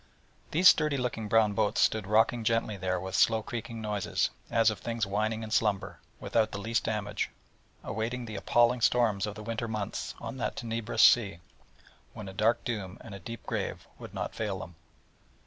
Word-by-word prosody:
These 175 Hz, +4 st, +5 dB
sturdy 150 Hz, -4 st, +5 dB
looking 120 Hz, -4 st, -2 dB
brown 110 Hz, -1 st, +4 dB
boats 105 Hz, 0 st, +1 dB
stood 110 Hz, -3 st, +2 dB
rocking 110 Hz, +2 st, +3 dB
gently 115 Hz, -1 st, +1 dB
there 90 Hz, -1 st, -1 dB
with 95 Hz, +1 st, -6 dB
slow 110 Hz, +2 st, +3 dB
creaking 115 Hz, -1 st, -6 dB
noises, 105 Hz, -2 st, 0 dB, 0.2 s
as 115 Hz, -1 st, +4 dB
of 105 Hz, -, -7 dB
things 115 Hz, -2 st, -2 dB
whining 110 Hz, +3 st, -1 dB
in 110 Hz, -, -7 dB
slumber, 100 Hz, -6 st, 0 dB, 0.2 s
without 110 Hz, -2 st, +1 dB
the -, -, -4 dB
least 115 Hz, +3 st, -1 dB
damage, 105 Hz, -2 st, -2 dB, 0.5 s
awaiting 115 Hz, +4 st, -3 dB
the 110 Hz, -2 st, -7 dB
appalling 120 Hz, +4 st, +3 dB
storms 110 Hz, -5 st, +2 dB
of 105 Hz, -, -5 dB
the 105 Hz, -, -8 dB
winter 115 Hz, +1 st, -3 dB
months 110 Hz, -3 st, -4 dB
on -, -, -6 dB
that 125 Hz, -, -2 dB
tenebrous 115 Hz, -3 st, 0 dB
sea, 100 Hz, -7 st, +5 dB, 0.8 s
when 105 Hz, -, -8 dB
a 95 Hz, -, -7 dB
dark 110 Hz, +4 st, +2 dB
doom, 105 Hz, -5 st, -4 dB
and 115 Hz, -5 st, -10 dB
a 100 Hz, -, -7 dB
deep 115 Hz, +6 st, -8 dB
grave, -, -, -3 dB
would -, -, -9 dB
not -, -, -3 dB
fail 105 Hz, -3 st, -2 dB
them. 85 Hz, -1 st, -8 dB
110 Hz, 180 wpm, -29 LUFS, 100-115 Hz, 0.8 s, These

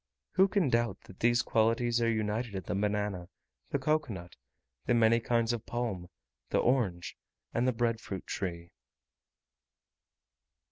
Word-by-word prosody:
Who 190 Hz, +1 st, +5 dB
can 195 Hz, -7 st, +2 dB
doubt 120 Hz, 0 st, +1 dB
that 95 Hz, -, -15 dB
these 120 Hz, +1 st, +3 dB
qualities 115 Hz, +1 st, +2 dB
are 115 Hz, -, +3 dB
united 110 Hz, 0 st, -1 dB
in 95 Hz, -, -3 dB
the -, -, -3 dB
banana, 100 Hz, -3 st, -1 dB, 0.4 s
the -, -, +1 dB
cocoa 150 Hz, 0 st, +1 dB
nut, 85 Hz, -3 st, -8 dB, 0.5 s
the 120 Hz, -, +4 dB
many 115 Hz, 0 st, +5 dB
kinds 115 Hz, 0 st, +1 dB
of 115 Hz, -, -5 dB
palm, 115 Hz, -7 st, -3 dB, 0.4 s
the -, -, +1 dB
orange, 105 Hz, -9 st, +1 dB, 0.4 s
and 120 Hz, +2 st, +1 dB
the -, -, +4 dB
bread 115 Hz, -1 st, 0 dB
fruit 95 Hz, -2 st, -6 dB
tree? 85 Hz, -4 st, -4 dB
115 Hz, 145 wpm, -31 LUFS, 100-120 Hz, 0.5 s, Who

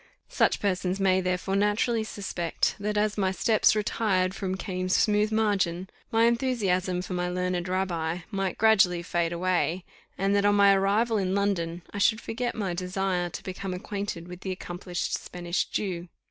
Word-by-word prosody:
Such -, -, +2 dB
persons 190 Hz, -1 st, -1 dB
may, 190 Hz, -1 st, +3 dB
therefore, 185 Hz, +1 st, -1 dB
naturally 210 Hz, +3 st, +1 dB
suspect, 195 Hz, -5 st, -2 dB
that, 210 Hz, +1 st, -2 dB
as 210 Hz, 0 st, +1 dB
"my 190 Hz, -1 st, +2 dB
steps 215 Hz, +3 st, +3 dB
retired 195 Hz, -3 st, +1 dB
from 190 Hz, -1 st, -3 dB
Cam's 185 Hz, -1 st, -1 dB
smooth 210 Hz, 0 st, +2 dB
margin," 195 Hz, -5 st, 0 dB, 0.2 s
my 225 Hz, 0 st, +4 dB
enthusiasm 200 Hz, -7 st, +1 dB
for 185 Hz, -, -5 dB
my 180 Hz, 0 st, -1 dB
learned 180 Hz, 0 st, -1 dB
rabbi 180 Hz, -2 st, -1 dB
might 195 Hz, -2 st, -2 dB
gradually 190 Hz, -6 st, +4 dB
fade 170 Hz, -1 st, -1 dB
away; 175 Hz, -1 st, 0 dB, 0.3 s
and 195 Hz, +1 st, +1 dB
that, 200 Hz, -, +3 dB
on 205 Hz, 0 st, +4 dB
my 200 Hz, -1 st, +6 dB
arrival 210 Hz, +3 st, +2 dB
in 190 Hz, 0 st, 0 dB
London, 175 Hz, -4 st, -1 dB
I 200 Hz, -, -4 dB
should 220 Hz, +2 st, +3 dB
forget 240 Hz, +1 st, -3 dB
my 195 Hz, -5 st, -2 dB
desire 180 Hz, 0 st, -1 dB
to -, -, -8 dB
become 185 Hz, 0 st, -5 dB
acquainted 195 Hz, -2 st, -5 dB
with 180 Hz, 0 st, -9 dB
the 190 Hz, -, -5 dB
accomplished 175 Hz, -1 st, -4 dB
Spanish 175 Hz, 0 st, -2 dB
Jew. 180 Hz, -4 st, -3 dB
190 Hz, 165 wpm, -27 LUFS, 180-205 Hz, 0.3 s, my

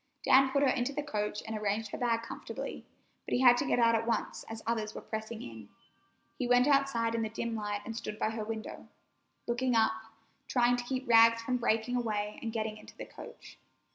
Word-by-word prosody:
Dan 265 Hz, 0 st, +6 dB
put 280 Hz, +1 st, +1 dB
her -, -, +4 dB
into 250 Hz, +1 st, 0 dB
the 295 Hz, +1 st, -3 dB
coach 210 Hz, -6 st, -3 dB
and 220 Hz, 0 st, -4 dB
arranged 215 Hz, +1 st, -2 dB
her -, -, -4 dB
bag 230 Hz, -2 st, +1 dB
comfortably, 230 Hz, -, -7 dB, 0.4 s
but -, -, -2 dB
he 250 Hz, -, +1 dB
had 245 Hz, -2 st, +8 dB
to 275 Hz, -, -1 dB
get -, -, +2 dB
out 230 Hz, -1 st, +4 dB
at 230 Hz, 0 st, 0 dB
once, 230 Hz, -2 st, -2 dB
as 225 Hz, 0 st, -7 dB
others 220 Hz, -2 st, -2 dB
were -, -, -6 dB
pressing 220 Hz, +1 st, -6 dB
in. 110 Hz, -3 st, -10 dB, 0.7 s
He 250 Hz, -, 0 dB
went 245 Hz, +1 st, +5 dB
outside 275 Hz, -5 st, +2 dB
in 230 Hz, -, 0 dB
the 220 Hz, -, -2 dB
dim 230 Hz, +1 st, -3 dB
light 205 Hz, -1 st, -3 dB
and 225 Hz, -, -5 dB
stood 215 Hz, -2 st, -5 dB
by 215 Hz, -, 0 dB
her 220 Hz, -1 st, -4 dB
window, 220 Hz, 0 st, -6 dB, 0.6 s
looking 245 Hz, +1 st, 0 dB
up, 220 Hz, 0 st, +4 dB, 0.5 s
trying 245 Hz, -1 st, +3 dB
to 245 Hz, -, -3 dB
keep 260 Hz, 0 st, -3 dB
Rags 230 Hz, 0 st, +6 dB
from 250 Hz, +1 st, 0 dB
breaking 230 Hz, 0 st, 0 dB
away 210 Hz, -3 st, -2 dB
and 225 Hz, -, -3 dB
getting 220 Hz, -1 st, -3 dB
into 215 Hz, -, -15 dB
the -, -, -6 dB
coach. -, -, -12 dB
230 Hz, 215 wpm, -31 LUFS, 220-245 Hz, 0.7 s, had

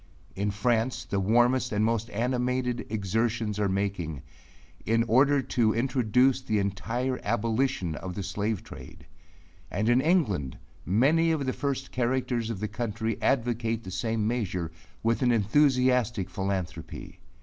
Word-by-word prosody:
In 100 Hz, +2 st, -1 dB
France 115 Hz, +3 st, 0 dB
the 100 Hz, -, -1 dB
warmest 120 Hz, +5 st, +3 dB
and 105 Hz, 0 st, +1 dB
most 115 Hz, 0 st, 0 dB
animated 125 Hz, +2 st, -1 dB
exertions 110 Hz, +1 st, -1 dB
are 100 Hz, -1 st, +1 dB
making, 95 Hz, -7 st, -2 dB, 0.6 s
in 115 Hz, +1 st, +2 dB
order 135 Hz, +4 st, +4 dB
to 115 Hz, -4 st, +1 dB
introduce 125 Hz, +1 st, +2 dB
the 110 Hz, -4 st, -1 dB
entire 115 Hz, +6 st, -1 dB
abolition 115 Hz, -4 st, 0 dB
of 90 Hz, +4 st, -6 dB
the 100 Hz, -, -3 dB
slave 100 Hz, +2 st, -2 dB
trade; -, -, -12 dB, 0.6 s
and 110 Hz, +2 st, -1 dB
in 120 Hz, +2 st, +4 dB
England 115 Hz, -, +1 dB, 0.3 s
many 145 Hz, -, +3 dB
of 150 Hz, -4 st, 0 dB
the 130 Hz, -, 0 dB
first 135 Hz, -2 st, -3 dB
characters 125 Hz, -2 st, -1 dB
of 110 Hz, -5 st, -4 dB
the 105 Hz, -, -1 dB
country 110 Hz, 0 st, -3 dB
advocate 115 Hz, -3 st, 0 dB
the 95 Hz, -, -7 dB
same 110 Hz, +1 st, -1 dB
measure, 95 Hz, -8 st, -2 dB, 0.3 s
with 115 Hz, +2 st, +1 dB
an 125 Hz, -2 st, +3 dB
enthusiastic 125 Hz, -2 st, +2 dB
philanthropy. 95 Hz, -3 st, -4 dB
115 Hz, 140 wpm, -27 LUFS, 105-125 Hz, 0.6 s, order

